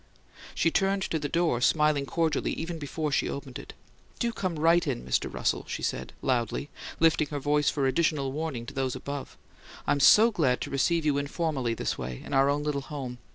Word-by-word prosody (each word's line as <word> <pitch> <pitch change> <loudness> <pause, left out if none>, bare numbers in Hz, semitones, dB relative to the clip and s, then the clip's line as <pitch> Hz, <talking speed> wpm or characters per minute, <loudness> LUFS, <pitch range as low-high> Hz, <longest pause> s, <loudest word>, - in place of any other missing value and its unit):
She 165 - +2
turned 195 +2 +1
to 160 - -1
the 145 -1 -3
door, 165 -8 +1
smiling 150 0 +3
cordially, 160 -2 0
even 165 0 -5
before 150 +1 -3
she - - +1
opened 140 -2 -6
it. - - -10 0.4
"Do 235 -1 -1
come 185 -6 -3
right 165 +3 +3
in, - - -2
Mr. 65 - 0
Russell," - - -1
she - - -5
said, - - -2
loudly, 125 +2 -1 0.3
lifting 160 -2 +3
her 145 - -4
voice 145 +1 +2
for 140 -2 -1
additional 140 0 +1
warning 145 -5 -4
to 140 - -9
those 135 -2 -1
above. 140 -1 -6 0.5
"I'm 145 - +1
SO 220 +11 +7
glad 135 - +1
to - - -4
receive 165 +4 +1
you 145 -2 +2
informally, 140 -5 -1
this - - -3
way, 60 -1 -6
in - - -7
our 135 +1 +4
own 145 +1 0
little 150 -2 -1
home. 135 -4 -6
145 Hz, 200 wpm, -28 LUFS, 135-165 Hz, 0.5 s, SO